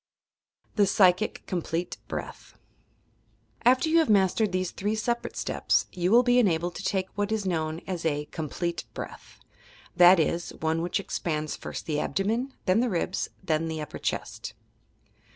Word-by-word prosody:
THE 205 Hz, -2 st, +5 dB
PSYCHIC 185 Hz, +1 st, +3 dB
(complete) 175 Hz, -1 st, -3 dB
BREATH -, -, -7 dB, 1.1 s
After 255 Hz, +6 st, +4 dB
you 330 Hz, +1 st, +4 dB
have 320 Hz, -, +2 dB
mastered 200 Hz, +1 st, +3 dB
these 185 Hz, -1 st, -1 dB
three 210 Hz, +2 st, -2 dB
separate 235 Hz, +2 st, -2 dB
steps, -, -, +1 dB
you 180 Hz, 0 st, -1 dB
will 235 Hz, +4 st, +6 dB
be 245 Hz, 0 st, +4 dB
enabled 175 Hz, -5 st, +1 dB
to 185 Hz, -, -7 dB
take 190 Hz, -1 st, 0 dB
what 205 Hz, +1 st, -2 dB
is 220 Hz, -2 st, -1 dB
known 160 Hz, -2 st, -1 dB
as 180 Hz, -3 st, -4 dB
a 150 Hz, -2 st, 0 dB
"complete 170 Hz, +2 st, -3 dB
breath." -, -, -8 dB, 0.3 s
— -, -, -24 dB
that 175 Hz, +1 st, +9 dB
is, 170 Hz, +2 st, -1 dB
one 160 Hz, +1 st, 0 dB
which 175 Hz, +4 st, -1 dB
expands 155 Hz, -5 st, -3 dB
first -, -, -7 dB
the 150 Hz, -2 st, -1 dB
abdomen, 225 Hz, -, -1 dB
then 185 Hz, +3 st, +3 dB
the 245 Hz, +1 st, +2 dB
ribs, 175 Hz, -5 st, -1 dB
then 160 Hz, 0 st, 0 dB
the 160 Hz, -1 st, -3 dB
upper 150 Hz, -, -6 dB
chest. -, -, -4 dB
185 Hz, 160 wpm, -27 LUFS, 165-215 Hz, 1.1 s, that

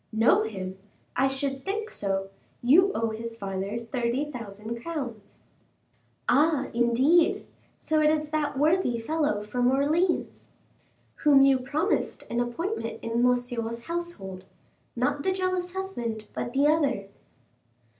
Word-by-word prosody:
"Know 225 Hz, +1 st, +4 dB
him! 190 Hz, -3 st, -5 dB, 0.4 s
I 270 Hz, -, +3 dB
should 270 Hz, 0 st, -2 dB
think 430 Hz, +3 st, -3 dB
so: 195 Hz, -1 st, -2 dB, 0.3 s
you 350 Hz, +11 st, +6 dB
owe 225 Hz, -1 st, 0 dB
his 225 Hz, +1 st, -6 dB
father 195 Hz, 0 st, -3 dB
thirty 240 Hz, +4 st, -2 dB
thousand 225 Hz, -1 st, -6 dB
crowns." 245 Hz, -10 st, -6 dB, 0.9 s
"Ah, 290 Hz, +1 st, +3 dB
indeed! 255 Hz, +8 st, +3 dB, 0.3 s
so 310 Hz, 0 st, 0 dB
it's 305 Hz, 0 st, +2 dB
that 300 Hz, -3 st, -1 dB
worthy 305 Hz, -4 st, +2 dB
fellow 260 Hz, -3 st, 0 dB
from 245 Hz, +4 st, +1 dB
Orleans." 305 Hz, +7 st, +1 dB, 0.7 s
"Whom 280 Hz, -3 st, +6 dB
you 270 Hz, -1 st, +5 dB
promised 280 Hz, +5 st, -1 dB
an 235 Hz, -, 0 dB
appointment 245 Hz, -, -2 dB
in 230 Hz, +1 st, 0 dB
Monsieur's 245 Hz, -2 st, 0 dB
household; 330 Hz, -, -4 dB, 0.5 s
not 280 Hz, +4 st, 0 dB
the 380 Hz, -, +1 dB
jealous 370 Hz, -1 st, -1 dB
husband, 240 Hz, -, -4 dB
but 240 Hz, -, -4 dB
the 275 Hz, +2 st, +3 dB
other." 290 Hz, -9 st, +2 dB
255 Hz, 125 wpm, -27 LUFS, 230-310 Hz, 0.9 s, you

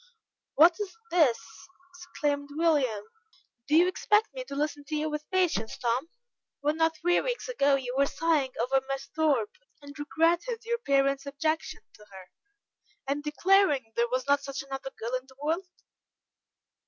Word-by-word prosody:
"What 330 Hz, +3 st, +6 dB
is 415 Hz, +1 st, -5 dB
this?" 305 Hz, -10 st, +4 dB, 0.5 s
exclaimed 295 Hz, -5 st, -3 dB
William. 290 Hz, -10 st, +1 dB, 0.6 s
"Do 300 Hz, -, +2 dB
you 345 Hz, +3 st, +6 dB
expect 420 Hz, +3 st, +1 dB
me -, -, -5 dB
to 280 Hz, -, -7 dB
listen 295 Hz, 0 st, -2 dB
to 305 Hz, -, -4 dB
you 305 Hz, +1 st, -1 dB
with 300 Hz, 0 st, -5 dB
patience, 355 Hz, -, 0 dB
Tom, 245 Hz, +6 st, -1 dB, 0.5 s
when 295 Hz, +2 st, 0 dB
not 325 Hz, 0 st, +2 dB
three 350 Hz, +2 st, +2 dB
weeks -, -, -3 dB
ago 285 Hz, -, +2 dB
you 255 Hz, -2 st, -3 dB
were 280 Hz, +1 st, +3 dB
sighing 305 Hz, -5 st, 0 dB
over 265 Hz, +2 st, +2 dB
Miss 275 Hz, 0 st, -3 dB
Thorpe, 290 Hz, -9 st, +1 dB, 0.2 s
and 285 Hz, -1 st, -11 dB
regretted 340 Hz, +10 st, 0 dB
your 470 Hz, 0 st, -1 dB
parents' 275 Hz, -, +1 dB
objection 310 Hz, +2 st, -2 dB
to 210 Hz, -, -17 dB
her, 190 Hz, -1 st, -12 dB, 0.7 s
and 280 Hz, +2 st, -1 dB
declaring 300 Hz, -, +2 dB
there 235 Hz, 0 st, +1 dB
was 255 Hz, +1 st, -1 dB
not 285 Hz, 0 st, +3 dB
such 275 Hz, -1 st, -5 dB
another 270 Hz, 0 st, -6 dB
girl 230 Hz, +2 st, -4 dB
in 255 Hz, +1 st, -3 dB
the 265 Hz, -, -18 dB
world?" 325 Hz, +6 st, -1 dB
295 Hz, 160 wpm, -28 LUFS, 270-335 Hz, 0.7 s, What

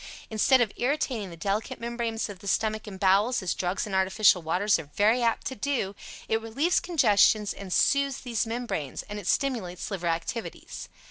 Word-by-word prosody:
Instead 245 Hz, +4 st, +4 dB
of 225 Hz, -4 st, +1 dB
irritating 250 Hz, -6 st, -1 dB
the 170 Hz, -, -10 dB
delicate 200 Hz, +5 st, -2 dB
membranes 235 Hz, -1 st, -3 dB
of 200 Hz, -3 st, -9 dB
the 200 Hz, -, -10 dB
stomach 215 Hz, +2 st, 0 dB
and 190 Hz, -2 st, -8 dB
bowels, 200 Hz, +5 st, +3 dB
as 180 Hz, -, 0 dB
drugs 180 Hz, +1 st, -2 dB
and 205 Hz, -, -7 dB
artificial 190 Hz, 0 st, +4 dB
waters 180 Hz, +5 st, +1 dB
are 150 Hz, -3 st, -9 dB
very 220 Hz, +4 st, +3 dB
apt 230 Hz, -1 st, 0 dB
to -, -, -2 dB
do, 255 Hz, -6 st, -2 dB, 0.3 s
it 220 Hz, 0 st, 0 dB
relieves 275 Hz, +11 st, +1 dB
congestions 210 Hz, -, +3 dB
and 195 Hz, -2 st, -9 dB
soothes 280 Hz, +5 st, +2 dB
these 235 Hz, -3 st, -1 dB
membranes, 225 Hz, -, -4 dB
and 205 Hz, 0 st, -7 dB
it 195 Hz, -, -8 dB
stimulates 220 Hz, -11 st, -1 dB
liver 180 Hz, -3 st, -3 dB
activities. 170 Hz, +8 st, -4 dB
215 Hz, 180 wpm, -27 LUFS, 190-240 Hz, 0.3 s, Instead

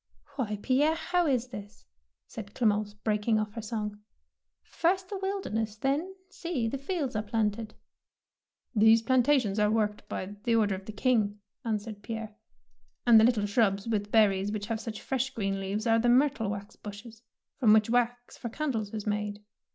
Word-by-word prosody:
« 285 Hz, -, -28 dB
Why, 215 Hz, -7 st, -2 dB
Pierre, 290 Hz, +5 st, +3 dB
how 345 Hz, +1 st, 0 dB
is 255 Hz, -3 st, +1 dB
this? 205 Hz, -3 st, -10 dB, 0.4 s
said 200 Hz, -2 st, -9 dB
Clemence, 210 Hz, -3 st, +1 dB
breaking 210 Hz, +1 st, +1 dB
off 215 Hz, -1 st, -2 dB
her 225 Hz, -, -5 dB
song; 210 Hz, -2 st, -4 dB, 0.4 s
" -, -, -59 dB, 0.2 s
first 370 Hz, +2 st, +2 dB
the 400 Hz, -, -4 dB
wilderness, 300 Hz, -, -2 dB
then, 295 Hz, -, -1 dB
see, 335 Hz, -10 st, -3 dB
the 270 Hz, +4 st, -3 dB
fields 280 Hz, -, -2 dB
are 215 Hz, -, +1 dB
planted! 215 Hz, 0 st, -2 dB, 0.5 s
" -, -, -47 dB
These 225 Hz, +1 st, +6 dB
plantations 250 Hz, -4 st, +3 dB
are 210 Hz, 0 st, +4 dB
worked 210 Hz, -1 st, -1 dB
by 200 Hz, +2 st, -5 dB
the 235 Hz, -1 st, +2 dB
order 210 Hz, -3 st, +3 dB
of 190 Hz, 0 st, -6 dB
the 215 Hz, -, -6 dB
King,'^ 210 Hz, -2 st, +1 dB, 0.3 s
answered 215 Hz, -2 st, -3 dB
Pierre, 220 Hz, -1 st, -6 dB, 0.7 s
and 235 Hz, -2 st, +8 dB
the -, -, +5 dB
little 225 Hz, -3 st, +3 dB
shrubs 200 Hz, -1 st, +1 dB
with 210 Hz, -2 st, -1 dB
ber 220 Hz, -2 st, +6 dB
ries 195 Hz, +1 st, -2 dB
which 210 Hz, -1 st, -3 dB
have 225 Hz, +1 st, -3 dB
such 220 Hz, -2 st, -6 dB
fresh 265 Hz, 0 st, -1 dB
green 195 Hz, -3 st, -1 dB
leaves 200 Hz, +3 st, -3 dB
are 225 Hz, -1 st, +4 dB
the 240 Hz, +1 st, +2 dB
myrtle 255 Hz, -3 st, +3 dB
wax 200 Hz, 0 st, -6 dB
bushes, 215 Hz, +2 st, -10 dB, 0.4 s
from 230 Hz, -6 st, +5 dB
which 215 Hz, -1 st, +5 dB
wax 245 Hz, +1 st, 0 dB
for 235 Hz, -, -6 dB
candles 225 Hz, -6 st, -2 dB
is 210 Hz, -, -4 dB
made. 210 Hz, 0 st, -2 dB
220 Hz, 180 wpm, -29 LUFS, 210-250 Hz, 0.7 s, and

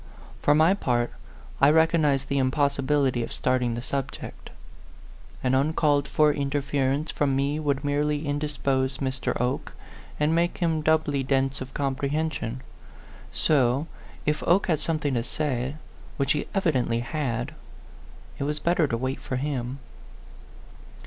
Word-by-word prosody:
For 145 Hz, -, +4 dB
my 160 Hz, +4 st, +5 dB
part, 120 Hz, -10 st, 0 dB, 0.5 s
I -, -, +7 dB
recognized 155 Hz, -3 st, +3 dB
the 140 Hz, -1 st, 0 dB
impossibility 140 Hz, -1 st, +1 dB
of 115 Hz, -, -4 dB
starting 125 Hz, -2 st, 0 dB
the 120 Hz, -, -5 dB
subject: 135 Hz, 0 st, -5 dB, 0.9 s
an 130 Hz, 0 st, +2 dB
uncalled 145 Hz, +1 st, +2 dB
for 150 Hz, +1 st, +3 dB
interference 140 Hz, +1 st, 0 dB
from 140 Hz, -2 st, +1 dB
me 140 Hz, +3 st, 0 dB
would 145 Hz, -2 st, -1 dB
merely 145 Hz, +1 st, 0 dB
indispose 140 Hz, -2 st, -1 dB
Mr. 130 Hz, -2 st, -2 dB
Oke, 125 Hz, +2 st, -1 dB, 0.5 s
and 150 Hz, +2 st, +2 dB
make 170 Hz, +1 st, +1 dB
him 170 Hz, -3 st, +1 dB
A -, -, +1 dB
PHANTOM 155 Hz, -, +3 dB
LOVER. 160 Hz, 0 st, +2 dB
119 140 Hz, -1 st, 0 dB
doubly -, -, -3 dB
dense 135 Hz, 0 st, 0 dB
of 130 Hz, 0 st, -7 dB
comprehension. 140 Hz, -2 st, -2 dB, 0.7 s
So, 135 Hz, -1 st, +2 dB, 0.4 s
if 150 Hz, 0 st, 0 dB
Oke 180 Hz, +4 st, +4 dB
had 160 Hz, -5 st, +1 dB
something 155 Hz, -2 st, -1 dB
to 120 Hz, -2 st, 0 dB
say, 130 Hz, -1 st, -2 dB, 0.4 s
which 140 Hz, -1 st, +1 dB
he 150 Hz, -, 0 dB
evidently 130 Hz, -11 st, +1 dB
had, 125 Hz, -1 st, -2 dB, 0.9 s
it -, -, -1 dB
was 150 Hz, +1 st, -1 dB
better 170 Hz, -2 st, +2 dB
to 115 Hz, -, -1 dB
wait 130 Hz, +3 st, -2 dB
for 130 Hz, -, -4 dB
him. 130 Hz, -1 st, -2 dB
140 Hz, 145 wpm, -26 LUFS, 130-150 Hz, 0.9 s, I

